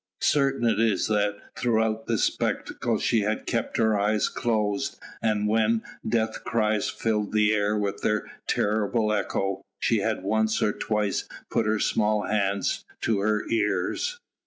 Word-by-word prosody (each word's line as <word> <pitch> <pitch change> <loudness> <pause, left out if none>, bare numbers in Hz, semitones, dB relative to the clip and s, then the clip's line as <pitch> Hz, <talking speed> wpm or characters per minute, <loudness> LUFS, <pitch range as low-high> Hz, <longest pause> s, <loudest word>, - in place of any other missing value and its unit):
Certain 135 -4 +2
it 115 - +2
is 110 -5 +2
that 105 -1 +1 0.2
throughout 110 -2 0
the 115 - +1
spectacle 115 +2 0
she 115 +2 +2
had 105 +1 -1
kept 115 - -1
her 110 -1 +3
eyes 105 +1 +2
closed, 110 +3 -1 0.2
and 105 -2 +1
when 110 +1 +2 0.3
death 110 -1 0
cries 110 -2 +1
filled 105 -2 -1
the 105 0 +4
air 105 0 +1
with 100 -1 -2
their 105 -1 0 0.2
terrible 105 +1 +1
echo, 95 -2 -1 0.2
she 115 - +2
had 110 -1 -1
once 110 +2 +1
or 105 - +2
twice 105 -2 -1 0.2
put 110 - +1
her 110 +1 +2
small 105 0 +1
hands 100 -2 0 0.2
to 110 -3 +1
her 105 +1 +1
ears. 105 - 0
110 Hz, 150 wpm, -26 LUFS, 105-110 Hz, 0.3 s, the